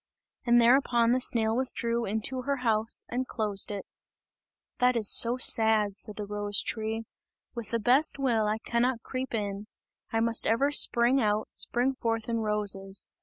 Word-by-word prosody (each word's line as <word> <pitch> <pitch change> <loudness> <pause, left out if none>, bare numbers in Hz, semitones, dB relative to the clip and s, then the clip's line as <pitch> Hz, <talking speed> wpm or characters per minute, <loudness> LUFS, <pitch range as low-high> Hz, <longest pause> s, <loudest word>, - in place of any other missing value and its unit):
And 240 0 +5
thereupon 240 -1 +3
the 255 - +2
snail 225 -2 +1
withdrew 235 -2 -2
into 220 +5 0
her 280 +2 -2
house 220 0 +1
and 255 +1 -3
closed 210 -4 -2
it. 205 -1 -6 0.9
"That 250 0 +2
is 215 -3 0
so 240 +2 +4
sad," 220 -4 +4
said 210 0 -4
the 210 - -6
rose 205 0 -2
tree, 220 0 -4 0.5
"with 235 -4 -7
the 230 - -1
best 255 +8 +2
will, 235 -6 0
I 215 +1 -1
cannot 235 +1 -2
creep 255 -2 -5
in, 205 -1 -5 0.4
I 225 - 0
must 230 0 +1
ever 275 +6 +1
spring 250 -1 +2
out, 210 -1 -1
spring 250 +3 -2
forth 225 -1 -2
in 230 -1 -2
roses. 205 -3 -1
230 Hz, 165 wpm, -27 LUFS, 210-245 Hz, 0.9 s, And